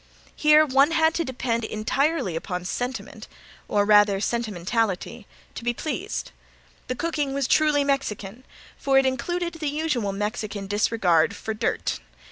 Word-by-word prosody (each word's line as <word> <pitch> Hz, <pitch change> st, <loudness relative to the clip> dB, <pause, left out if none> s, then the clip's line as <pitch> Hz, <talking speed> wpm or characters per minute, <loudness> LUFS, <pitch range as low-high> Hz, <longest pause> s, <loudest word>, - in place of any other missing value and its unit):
Here 305 Hz, 0 st, +5 dB
one 275 Hz, +1 st, +4 dB
had 320 Hz, -1 st, +3 dB
to 335 Hz, -, 0 dB
depend 240 Hz, -4 st, -2 dB
entirely 220 Hz, -, 0 dB
upon 180 Hz, +2 st, -4 dB
sentiment, 225 Hz, 0 st, -5 dB, 0.4 s
or 205 Hz, -1 st, +2 dB
rather 205 Hz, -1 st, +5 dB
sentimentality, 220 Hz, 0 st, -2 dB, 0.3 s
to -, -, -8 dB
be 240 Hz, 0 st, 0 dB
pleased. 360 Hz, -, -4 dB, 0.6 s
The 255 Hz, -, -2 dB
cooking 295 Hz, -2 st, -2 dB
was 275 Hz, -2 st, 0 dB
truly 300 Hz, -1 st, +3 dB
Mexican 250 Hz, -5 st, -2 dB, 0.4 s
for 270 Hz, -1 st, +2 dB
it 270 Hz, -, +5 dB
included 340 Hz, +6 st, -2 dB
the 305 Hz, -2 st, -1 dB
usual 290 Hz, -9 st, -1 dB
Mexican 210 Hz, 0 st, -4 dB
disregard 195 Hz, -5 st, +2 dB
for 220 Hz, -, -4 dB
dirt. 215 Hz, -, -2 dB
240 Hz, 135 wpm, -24 LUFS, 210-290 Hz, 0.6 s, Here